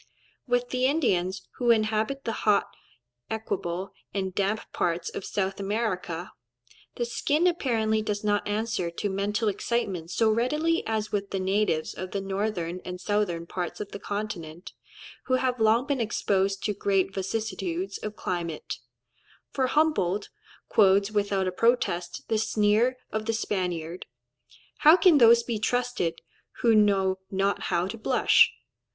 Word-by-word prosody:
With 245 0 +1
the 255 0 +1
Indians 190 - 0
who 245 -1 0
inhabit 220 +4 +2
the 230 - -2
hot, 205 -2 +3 0.6
equable, 190 -4 -3 0.2
and 190 -2 -2
damp 200 +3 0
parts 170 0 -1
of - - -6
South 195 0 -2
America, 195 -4 -2 0.6
the 240 - -1
skin 290 +7 0
apparently 225 -11 +1
does 210 -1 -3
not 205 -1 +1
answer 210 -4 -1
to 170 +4 -3
mental 205 +3 -1
excitement 195 -5 -1
so 220 +5 +2
readily 300 +9 +1
as 220 -1 -1
with 200 -1 -2
the 195 - -2
natives 190 -4 0
of 185 0 -6
the 200 - 0
northern 195 -3 -2
and 180 0 -6
southern 185 -4 -1
parts 175 0 -4
of 205 -1 -6
the 200 - -6
continent, 185 -6 -5 0.5
who 255 - +2
have 255 -1 0
long 220 +3 +4
been 280 -3 -1
exposed 195 -4 0
to 210 - 0
great 195 -1 0
vicissitudes 195 -2 -3
of 215 0 -6
climate; 170 -3 -4 0.7
for 260 -2 +1
Humboldt 250 - +1 0.4
quotes 200 0 +4
without 200 -2 0
a - - 0
protest 180 -5 0
the 220 -1 +1
sneer 215 +3 +2
of 215 0 -3
the 225 - +1
Spaniard, 180 -6 -3 0.7
"How 315 +4 +8
can 335 -4 +6
those 235 0 +7
be 230 -3 -3
trusted, 245 -6 -1 0.4
who 230 -2 +4
know 195 -3 +3
not 195 +1 0
how 175 -1 +1
to 220 +4 -6
blush?" - - +4
205 Hz, 145 wpm, -27 LUFS, 190-230 Hz, 0.7 s, How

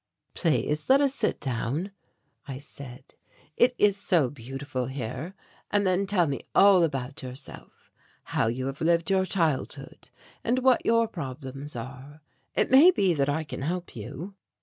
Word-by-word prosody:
"Please 150 - 0
let 270 +1 +7
us 280 -2 +2
sit - - -1
down," 135 - -2 0.6
I 135 -2 -5
said; 135 -2 -11 0.4
"it 250 +1 +3
is 205 -2 +4
so 170 -9 +1
beautiful 135 0 -5
here; 130 - -5 0.3
and 205 -1 +1
then 185 +1 +1
tell 190 -4 +3
me 140 -3 -3
all 195 -3 +7
about 135 -3 -2
yourself, 130 +1 -10 0.4
how - - +2
you 125 +3 -2
have 135 +1 -5
lived 170 +3 +2
your 190 -1 +3
childhood, 165 -8 -2 0.3
and 245 +2 +1
what 260 -1 +3
your 230 0 +4
problems 140 - -7
are. 135 +5 -9 0.3
It - - +1
may 280 +7 +9
be 195 - +3
that 140 -2 0
I 155 +3 0
can 150 - -7
help 175 +5 -3
you." 135 - -7
150 Hz, 155 wpm, -27 LUFS, 135-195 Hz, 0.6 s, may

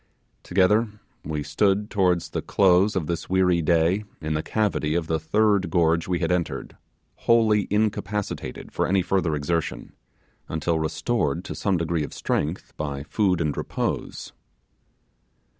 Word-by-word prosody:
Together 105 +5 +3 0.3
we 75 -1 -3
stood 100 +8 +1
towards 90 -4 +1
the - - -2
close 95 +1 +3
of 90 -5 0
this 85 +1 -4
weary 90 -2 +3
day 85 +5 +2 0.2
in 80 -1 -3
the 75 - 0
cavity 90 -7 0
of 85 -2 0
the 80 0 -1
third 100 +3 +2
gorge 85 -1 +2
we 90 -1 0
had 85 0 -1
entered, 90 -2 -2 0.5
wholly 110 -3 +4
incapacitated 105 -8 -2
for - - 0
any 95 -1 +2
further 90 -3 +1
exertion, 80 +2 -2 0.6
until 80 +1 0
restored 80 - -1
to - - -5
some 100 -3 0
degree 85 -1 -1
of - - -7
strength 80 +5 -2
by 70 -2 -4
food 95 +2 +1
and 75 -4 0
repose. - - -3
90 Hz, 140 wpm, -24 LUFS, 80-100 Hz, 0.6 s, wholly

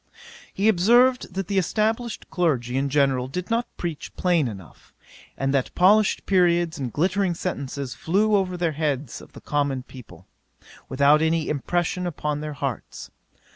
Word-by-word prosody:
'He 200 +3 0
observed, 235 +3 +3
that 195 -1 -3
the 200 -1 +1
established 220 +5 -1
clergy 135 -9 0
in 140 +1 0
general 135 -3 +1
did 180 +9 -5
not 230 +1 +1
preach 165 -5 -5
plain 175 -6 +1
enough; 95 -7 -11 0.4
and 135 0 -1
that 135 -2 -1
polished 205 +3 +4
periods 175 -4 +2
and 130 -3 -3
glittering 185 - 0
sentences 140 -6 -4
flew 210 +5 +1
over 185 -2 0
the 170 -2 0
heads 145 -4 -3
of - - -16
the - - -12
common 140 -3 -1
people, 100 -10 -14 0.6
without 140 +3 +4
any 160 0 +1
impression 175 +5 -1
upon 150 -3 -3
their 150 0 -5
hearts. 135 -4 -5
160 Hz, 150 wpm, -24 LUFS, 140-185 Hz, 0.6 s, polished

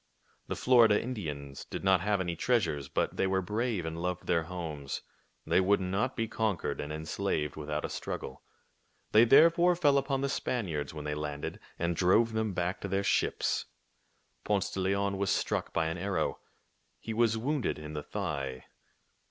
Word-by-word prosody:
The - - -2
Florida 115 -5 +5
Indians 75 - -5
did - - -6
not 95 -2 +4
have 100 +1 +1
any 85 -2 -2
treasures; 80 - 0
but - - -1
they 95 - +2
were 95 0 +1
brave 105 -1 -1
and 80 +1 -4
loved 90 0 -2
their 85 - +2
homes. 80 -6 -5 0.4
They - - +3
would 100 +2 +3
not 95 +7 -1
be 115 -1 -1
conquered 110 -5 -1
and 75 - -5
enslaved 80 -1 -2
without 75 0 -3
a - - -4
struggle. 65 - -5 0.7
They 110 +2 +7
therefore 170 +7 +6
fell 145 -5 +4
upon 135 0 -1
the 140 - +1
Spaniards 85 - -2
when 75 -1 -7
they 75 - -1
landed, 75 -1 -4 0.2
and 85 0 0
drove 110 +7 +3
them 110 -1 0
back 90 +2 -2
to - - -3
their 100 +1 0
ships. - - +1 0.8
Ponce 100 -2 0
de - - -4
Leon 100 +1 0
was 100 -1 0
struck - - 0
by 85 - +1
an 80 +2 -2
arrow. 100 +1 -1 0.6
He 115 - -5
was 115 0 +2
wounded 140 +4 -1
in 75 0 -8
the 75 - -3
thigh. 70 -10 -4
95 Hz, 175 wpm, -30 LUFS, 80-110 Hz, 0.8 s, They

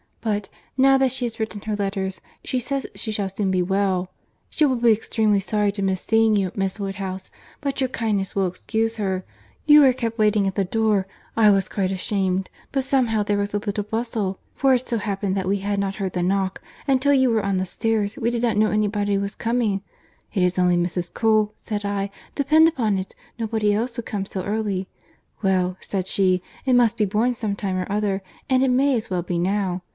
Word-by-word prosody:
But, 210 -3 -2 0.3
now 270 0 +5
that 265 -1 +3
she 255 0 -2
has 230 -1 -5
written 220 -2 -3
her 215 0 -2
letters, 195 -2 -3 0.2
she 255 - -1
says 270 +2 -2
she 220 - -4
shall 205 -2 -1
soon 195 0 -2
be 185 -1 +2
well. 190 -1 0 0.4
She 310 - +3
will 265 -3 +2
be 235 -1 +4
extremely 215 -1 +2
sorry 210 +1 0
to 200 - -4
miss 190 -1 0
seeing 225 -1 +3
you, 190 -3 +1
Miss 195 +1 -1
Woodhouse, 195 -1 -4 0.3
but 275 -1 -2
your 260 - +2
kindness 215 -6 -2
will 195 -1 +2
excuse 225 +5 -1
her. 190 -3 -1 0.4
You 300 0 +8
were 265 -3 +6
kept 230 -2 -3
waiting 210 -1 +3
at 190 - -1
the 195 - +1
door—I 215 +1 +1
was 195 -2 +3
quite 190 -2 -1
ashamed—but 190 +6 -2
somehow 245 -5 +1
there 205 0 0
was 205 0 -1
a - - +2
little 205 0 -2
bustle—for 225 +3 -1
it 250 +1 -2
so 235 - 0
happened 200 -2 -2
that 190 -1 -2
we 200 +1 +2
had 200 +1 -1
not 195 0 -1
heard 195 -3 -3
the 180 - -1
knock, 190 +1 0 0.3
and 265 -2 +3
till 285 +1 +4
you 260 -3 +4
were 220 -2 +1
on 200 -1 +1
the 185 - 0
stairs, 215 +2 -1
we 230 - 0
did 240 0 -2
not 230 -3 +1
know 215 0 +4
any 215 0 +2
body 205 -1 0
was 200 +1 -2
coming. 225 -4 0 0.5
'It 190 -4 +1
is 180 +1 +1
only 180 -1 +3
Mrs. 175 0 -1
Cole,' 215 -2 +2
said 210 -1 -4
I, 200 -1 -2 0.2
'depend 310 +3 +5
upon 225 -11 +1
it. 190 - -7 0.2
Nobody 220 -2 +1
else 235 +4 -2
would 235 - -4
come 195 -2 -3
so 190 -2 -4
early.' 205 -2 -2 0.5
'Well,' 185 -2 +1
said 190 -2 -3
she, 185 -2 +1 0.2
'it 260 - +2
must 235 -2 +4
be 215 - +2
borne 220 +5 +1
some 215 -4 -2
time 195 -2 -2
or 185 +1 -3
other, 200 -1 0 0.3
and 260 0 +4
it 265 - +3
may 265 +2 +3
as 225 - -3
well 180 -2 -1
be 175 -1 -2
now. 185 0 0
205 Hz, 215 wpm, -23 LUFS, 195-230 Hz, 0.5 s, You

